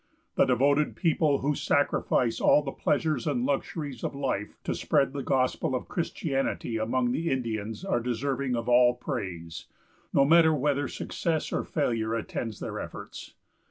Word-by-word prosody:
The - - +4
devoted 140 +4 +2
people 155 -5 +2
who 145 +2 +1
sacrifice 125 -5 +1
all 150 - +5
the 135 - -4
pleasures 150 -3 0
and 125 -4 0
luxuries 140 -1 -3
of - - -3
life 130 -7 -3
to - - -1
spread 135 0 +1
the 140 - -3
gospel 130 -1 0
of 125 - -4
Christianity 135 -8 -2
among 120 +3 0
the 165 +6 -1
Indians 115 - -3
are 155 -11 +1
deserving 130 +2 -1
of 115 -1 -3
all 125 0 +5
praise, 85 -8 -5 0.4
no 140 - +4
matter 160 +1 +6
whether 145 0 0
success 160 +3 -2
or - - 0
failure 115 -7 -1
attends 115 -1 -4
their - - -5
efforts. - - -8
130 Hz, 155 wpm, -28 LUFS, 120-145 Hz, 0.4 s, matter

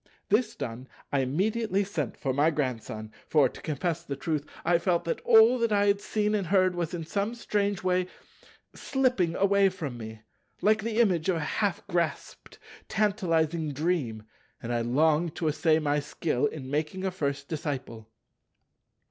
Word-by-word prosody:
This 215 +2 +2
done, 125 +1 -6 0.3
I 140 - +3
immediately 200 - 0
sent 165 - -4
for 135 - -1
my 145 +4 +3
Grandson; 115 -7 -3 0.2
for, 150 -4 +4
to - - -11
confess 160 +1 -2
the 140 - -5
truth, 155 -1 -2 0.2
I 170 -1 +4
felt 170 0 0
that 170 - -2
all 230 +2 +6
that 230 -1 +1
I 205 -1 +3
had 200 0 +2
seen 210 0 0
and 200 -4 0
heard 185 0 +3
was 175 0 -3
in 165 - -4
some 200 +7 -2
strange 205 -4 -1
way 180 0 +1 0.7
slipping 250 -11 0
away 200 0 +4
from 150 -10 -6
me, 110 -1 -8 0.4
like 215 +1 +3
the 225 +1 -2
image 185 -7 +2
of 185 - +3
a - - -1
half 195 +4 -1
grasped, 170 -2 -3 0.3
tantalizing 165 -7 +1
dream, 140 -8 -1 0.4
and 120 +1 -4
I 120 - +1
longed 155 +7 +2
to 165 - -2
essay 155 +1 +3
my 150 -2 +1
skill 145 -1 -1
in 135 -3 -7
making 155 +6 -2
a 190 - 0
first 140 -5 -3
disciple. 130 -8 -5
170 Hz, 165 wpm, -28 LUFS, 145-200 Hz, 0.7 s, all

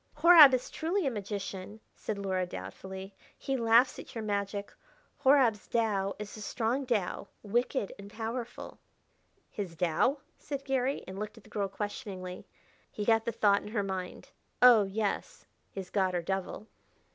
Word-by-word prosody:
"Horab 315 -2 +9
is 250 - -4
truly 350 +3 -1
a 270 - +1
magician," 200 -1 -5
said 215 - -5
Luhra 190 -2 -1
doubtfully; 190 - -8 0.2
"he 270 - -2
laughs 235 +1 +4
at - - -11
your 225 - -3
magic. 200 -1 -3 0.5
Horab's 265 -6 +4
Tao 205 -4 0
is 210 -1 -7
a 215 - -9
strong 240 +5 -1
Tao, 205 -5 -1 0.2
wicked 235 +1 0
and 200 0 -10
powerful." 230 +2 -6 0.7
"His 190 -5 -5
Tao?" 180 - +2 0.2
said 280 -2 -5
Garry, 265 0 0
and 190 +1 -7
looked 210 +1 -5
at 225 - -14
the - - -19
girl 200 -2 -1
questioningly. 195 -3 -6 0.4
He 210 - -4
got 225 0 +3
the 235 - 0
thought 205 -2 +3
in - - -10
her 210 -1 -1
mind. 190 -2 -5 0.3
"Oh, 240 -4 +8
yes 205 +1 -3 0.2
his 190 -2 -7
god, 190 -2 +1
or 175 - -1
devil." 190 +3 -3
210 Hz, 155 wpm, -30 LUFS, 195-240 Hz, 0.7 s, Horab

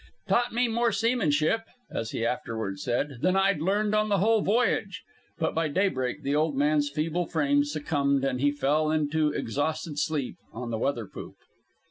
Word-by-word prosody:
"Taught 240 0 +2
me 245 +2 +1
more 235 0 +1
seamanship," 225 -5 +1 0.3
as 115 - -3
he 115 - -2
afterward 110 -5 -3
said, 125 +4 -2
"than 185 +1 +2
I'd 195 -4 +2
learned 205 +4 +1
on 215 0 +2
the 200 - +3
whole 220 +3 +3
voyage." 205 -3 0 0.3
But 160 - -1
by 165 -1 +1
daybreak 145 -7 -1
the 140 - 0
old 150 -2 +1
man's 145 0 +2
feeble 160 +4 -1
frame 145 -3 +2
succumbed, 145 -2 0
and 130 -2 -1
he 145 0 +3
fell 145 +2 +1
off - - +2
into 155 +1 +1
exhausted 150 +4 -2
sleep 145 -4 -2
on 120 +1 -6
the 110 - -2
weather 120 -3 -1
poop. - - -10
155 Hz, 175 wpm, -27 LUFS, 140-195 Hz, 0.3 s, the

